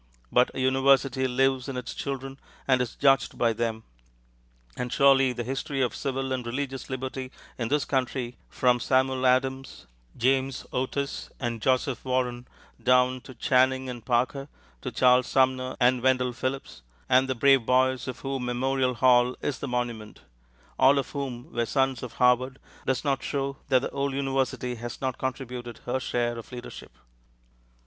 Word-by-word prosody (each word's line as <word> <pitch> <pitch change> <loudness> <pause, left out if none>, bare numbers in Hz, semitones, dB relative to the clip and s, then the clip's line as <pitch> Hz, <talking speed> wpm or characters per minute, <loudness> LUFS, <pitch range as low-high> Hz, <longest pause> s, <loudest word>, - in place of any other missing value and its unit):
But 125 +1 +4
a - - -3
university 130 0 +3
lives 130 +1 +1
in 130 - -4
its 125 -1 -5
children, 135 0 -5 0.3
and 130 -2 +3
is 120 -2 -3
judged 135 -2 +3
by 115 -1 +2
them; 110 0 -2 0.9
and 125 -1 -4
surely 135 -1 +5
the 120 -1 -4
history 135 +2 -3
of 120 - -1
civil 135 -1 -3
and 130 -1 -1
religious 135 +2 -4
liberty 130 0 -5 0.3
in 120 - -1
this 145 +4 +1
country 130 -2 -2
from 125 -1 +2
Samuel 130 +1 +2
Adams, 130 +1 0 0.3
James 130 +1 +1
Otis, 140 +2 -2
and 120 -3 -3
Joseph 130 0 0
Warren 125 -1 -1 0.3
down 125 0 +3
to 130 - -12
Channing 130 +1 +2
and 120 -2 -7
Parker, 130 +3 0 0.3
to - - -4
Charles 125 0 +4
Sumner 130 -1 +1
and 125 0 +3
Wendell 125 -1 +2
Phillips, 130 - -4 0.3
and 130 +1 +4
the 130 - 0
brave 135 -1 +4
boys 130 0 +2
of 130 -2 -6
whom 135 -2 -3
Memorial 130 +1 0
Hall 125 0 +4
is 145 - -3
the 140 - -4
monument, 120 -4 -4 0.6
all 135 +2 +6
of 135 - -2
whom 130 -4 -5
were 120 -1 0
sons 135 -1 +1
of 125 - -7
Harvard, 125 +1 +2 0.3
does 130 -2 0
not 140 -2 +1
show 140 -1 -3
that 130 -1 +4
the - - -3
old 140 0 -2
university 135 -2 -1
has 120 0 -7
not 130 -2 -3
contributed 125 -2 -5
her 125 +2 -1
share 120 -2 -1
of 115 - -12
leadership. 120 - -9
130 Hz, 160 wpm, -27 LUFS, 125-135 Hz, 0.9 s, all